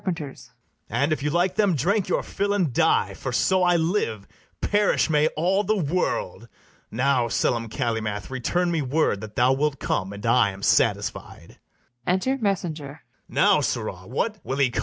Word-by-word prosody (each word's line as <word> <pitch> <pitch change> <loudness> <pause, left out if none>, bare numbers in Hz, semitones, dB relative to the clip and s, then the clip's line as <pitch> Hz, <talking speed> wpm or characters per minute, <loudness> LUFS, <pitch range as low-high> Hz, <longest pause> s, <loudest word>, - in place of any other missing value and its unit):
And, 145 +3 +1
if 155 - -3
you 150 - 0
like 175 +4 +1
them, 200 -5 +2
drink 190 - 0
your - - +1
fill 200 0 -1
and 180 -10 0
die; - - +2
For, - - -5
so 190 0 +2
I 175 -1 +4
live, 160 - -1 0.3
perish 205 -5 +2
may 150 0 +4
all 185 +5 +2
the 215 +1 +1
world! 165 -7 -2 0.4
Now, 125 0 +1
Selim 115 +2 0
Calymath, 110 -3 -3
return 175 +8 0
me 165 -2 0
word 135 -6 0
That 110 -1 -9
thou 125 +2 +4
wilt 145 +1 0
come, 95 -6 -2
and 100 +1 -8
I 115 -4 +3
am 95 +1 -12
satisfied. - - 0 0.5
Enter 225 +10 +1
MESSENGER. 160 - -3 0.3
Now, - - +3
sirrah; - - -3
what, 215 -2 -2
will 135 - -3
he 135 -3 +2
come? - - -2
150 Hz, 165 wpm, -24 LUFS, 120-180 Hz, 0.5 s, I